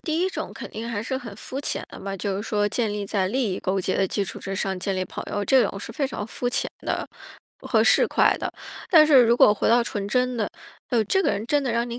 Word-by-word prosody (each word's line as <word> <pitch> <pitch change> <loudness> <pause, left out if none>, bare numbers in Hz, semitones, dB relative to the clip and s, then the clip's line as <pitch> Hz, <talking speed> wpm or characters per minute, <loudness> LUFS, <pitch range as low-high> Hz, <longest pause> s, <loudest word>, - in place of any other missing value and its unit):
第 315 0 -2
1 375 - +1
种 - - -5
肯 - - -8
定 225 +2 -6
还 220 -3 -3
是 260 +3 -2
很 230 -6 -9
肤 265 +5 -6
浅 - - -3
的 - - -10
吧， 195 0 -5
就 195 0 -2
是 205 - -3
说 210 -1 0
建 215 0 -1
立 205 -1 -3
在 195 -1 0
利 235 -2 0
益 185 - -3
勾 190 +1 -1
结 185 - -1
的 195 - +2
基 200 +2 -1
础 - - -7
之 195 - -5
上 190 -1 -2
建 195 +1 -2
立 185 - -1
朋 - - -7
友， 205 - -1
这 260 +3 +5
种 195 - -6
是 205 - -8
非 275 +4 -1
常 220 -5 -5
肤 245 +2 -3
浅 - - -1 0.2
的 - - -1 0.6
和 - - +2
市 - - +5
侩 - - +3
的。 - - -4 0.4
但 320 -5 +7
是 275 -5 +7
如 235 +1 +4
果 210 - +7
回 210 - 0
到 235 +1 +5
纯 205 -3 -4
真 250 +3 0
的， 215 - -1 0.4
哟， 235 -3 +3
这 385 - +2
个 - - +2
人 200 +2 -2
真 290 +3 +2
的 250 -3 -1
让 235 +1 0
你 235 +1 -5
220 Hz, 295 characters per minute, -24 LUFS, 200-250 Hz, 0.6 s, 但